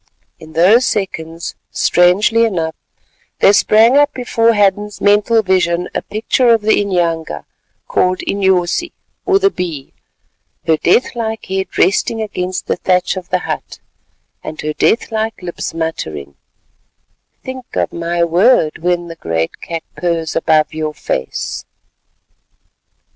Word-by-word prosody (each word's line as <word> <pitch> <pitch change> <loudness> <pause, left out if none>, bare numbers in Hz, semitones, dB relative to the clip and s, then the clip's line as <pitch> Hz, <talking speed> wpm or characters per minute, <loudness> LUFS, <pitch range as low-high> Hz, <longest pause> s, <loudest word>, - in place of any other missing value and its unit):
In 160 0 -13
those 205 +10 +5
seconds, 170 -5 -3 0.2
strangely 200 +6 +3
enough, 170 -8 -1 0.6
there 200 - +5
sprang 225 +5 +5
up 290 0 +4
before 230 -2 +2
Hadden's 205 0 +1
mental 210 +2 +3
vision 180 -2 +1
a - - -1
picture 225 +4 0
of 230 -2 +4
the 215 0 +3
inyanga 170 -5 -1 0.4
called 185 0 +1
Inyosi 190 - +1 0.3
or 390 - +4
the 395 0 +2
Bee, 165 - -5 0.7
her 160 -1 +3
death 180 +10 +2
like 225 -2 -4
head 190 0 -4
resting 200 +5 +2
against 185 -4 -3
the - - -1
thatch 180 +1 +1
of 185 -2 -7
the 185 - +2
hut, - - -5 0.7
and 155 - -7
her 155 0 -3
death 230 +9 +1
like 220 0 -2
lips 175 -2 -5
muttering 80 - -4 1.1
"think 260 -1 -7
of - - -1
my 170 0 -1
word 170 0 +3
when 175 +1 -1
the 165 -1 -9
great 80 - -3
cat 165 -1 -5
purrs 170 -3 -2
above 155 -2 +2
your 155 -1 -3
face." 65 - -4
185 Hz, 130 wpm, -16 LUFS, 165-220 Hz, 1.1 s, those